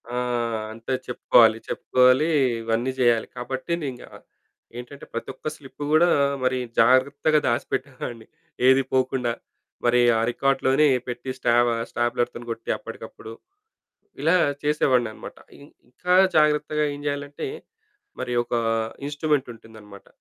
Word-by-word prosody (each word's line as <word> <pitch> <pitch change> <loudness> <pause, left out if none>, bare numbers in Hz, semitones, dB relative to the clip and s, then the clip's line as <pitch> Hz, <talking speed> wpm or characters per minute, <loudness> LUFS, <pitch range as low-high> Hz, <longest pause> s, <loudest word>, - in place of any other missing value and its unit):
ఆ! - - -2 0.6
అంటే 115 +4 -5
చెప్పుకోవాలి, 115 -2 +4
చెప్పుకోవాలి. 130 +4 +3 0.3
ఇవన్నీ 115 +3 -1
చేయాలి. 120 -2 +3
కాబట్టి 130 +4 -5
నేను 145 - -3
ఇంక 120 - -13 0.7
ఏంటంటే 125 +3 -9
ప్రతి 115 - -5
ఒక్క - - -9
స్లిప్పు 140 +1 -10
కూడా 170 +3 +5 0.4
మరి 130 0 +1 0.2
జాగ్రత్తగా 140 +6 +4
దాచిపెట్టేవాడిని. 125 -2 -3 0.4
ఏది 130 +1 +6
పోకుండా 130 -2 +1 0.5
మరి 120 0 +4 0.2
ఆ - - +1
రికార్డ్‌లోనే 135 +3 +2 0.2
పెట్టి 125 +1 -6
స్టాబా 120 -1 +2 0.2
స్టాబ్లెర్‌తోని 120 0 -2
కొట్టి 115 0 -7
అప్పటికప్పుడు 110 - -10 0.9
ఇలా 165 +4 +4 0.3
చేసేవాడినన్నమాట. 130 -6 0 0.2
ఇ - - -17 0.3
ఇంక 125 - -34 0.3
జాగ్రత్తగా 150 0 +2
ఏం 145 - -9
జేయాలంటే 145 0 -4 0.7
మరి 125 -1 -3
ఒక 120 - -4 0.5
ఇన్స్‌ట్రూమెంటుంటుందన్నమాట. 115 -9 -4
130 Hz, 110 wpm, -24 LUFS, 120-145 Hz, 0.9 s, ఏది